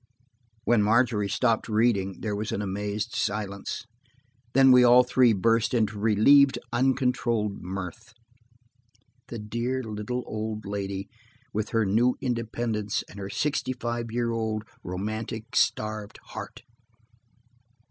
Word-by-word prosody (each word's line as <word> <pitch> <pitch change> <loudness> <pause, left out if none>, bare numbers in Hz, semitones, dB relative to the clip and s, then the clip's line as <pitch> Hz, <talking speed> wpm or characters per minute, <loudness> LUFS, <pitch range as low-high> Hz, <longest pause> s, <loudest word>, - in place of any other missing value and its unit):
When 120 -1 +3
Margery 110 -1 +2
stopped 115 +2 +1
reading, 105 -4 +1
there 105 -2 -2
was 105 +1 -3
an 105 - -2
amazed 105 +3 -3
silence. 100 +1 -3 0.7
Then 135 -1 +7
we 125 -1 +7
all 125 +1 +7
three 125 -1 +4
burst 115 +3 +2
into 110 -2 0
relieved, 125 +7 +5 0.2
uncontrolled 120 -4 +1
mirth. 95 +4 -6 1.2
The 120 - -6
dear, 120 +5 -3
little, 110 +3 -4
old 110 0 -4
lady 100 -1 -4 0.5
with 110 +1 -2
her 115 -1 +1
new 115 +6 +3
independence 115 -3 -2
and 100 - -10
her 95 0 -5
sixty 145 +1 -1
five 120 -1 -4
year 120 0 0
old, 110 -2 -2 0.2
romantic, 110 +5 -5
starved 105 -1 0
heart! - - -8
110 Hz, 120 wpm, -26 LUFS, 105-120 Hz, 1.2 s, Then